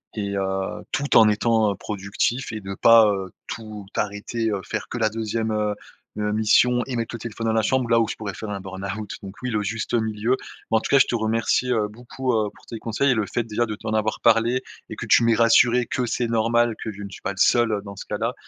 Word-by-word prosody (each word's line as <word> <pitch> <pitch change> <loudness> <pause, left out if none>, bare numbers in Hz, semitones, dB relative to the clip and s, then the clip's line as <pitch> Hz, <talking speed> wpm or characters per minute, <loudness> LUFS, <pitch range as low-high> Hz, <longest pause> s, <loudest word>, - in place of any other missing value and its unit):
et 100 -2 -3
heu, 95 0 -2
tout 145 0 +2
en 110 - +8
étant 110 -1 +2
productif 105 +5 -2
et 110 -1 -5
de 95 0 -6
pas, 115 +1 +7
heu, 95 -2 -5 0.2
tout 110 -2 -7
arrêter, 105 +2 -2
heu, 100 -2 -2
faire - - -4
que - - -4
la 110 - +2
2e, 110 0 -2
heu 105 -1 0 0.5
heu, 105 0 0
mission 120 +3 +3
et 130 - -3
mettre 115 0 -3
le - - -7
téléphone 115 0 -4
dans 110 - +2
la 110 -1 +2
chambre, 130 +1 +1
là, 115 -1 +5
où 115 - +2
je - - -3
pourrais 100 -4 -6
faire 110 - -6
un 100 -1 -4
burn-out, 95 +2 -6
donc 95 - -7
oui, 125 - -1
le 105 -2 0
juste 110 +4 -2
milieu. 110 +2 0 0.3
Bah 110 - +5
en - - 0
tout - - -5
cas, 140 - +5
je - - +5
te - - -1
remercie, 115 +3 +1
heu, 110 -3 +1
beaucoup, 125 +4 -4
heu, 105 -2 +1
pour - - -20
tes 115 - -6
conseils 115 +6 0
et - - +2
le 110 -2 0
fait 120 - -1
déjà 115 +1 -1
de 110 - -4
t'en 110 +1 -5
avoir 110 0 0
parlé 115 +2 +3 0.3
et - - -6
que - - -6
tu - - +5
m'es 115 - +4
rassuré 120 +1 +4
que 125 - -1
c'est 120 +1 -1
normal 115 0 +2
que 110 - -4
je 105 0 -10
ne 100 - -7
suis 100 - -11
pas - - -1
le 95 - -17
seul, 120 -2 +4
heu, 100 - -1
dans 100 -1 -9
ce - - -7
cas-là, 115 +3 -2
110 Hz, 255 wpm, -23 LUFS, 105-115 Hz, 0.5 s, en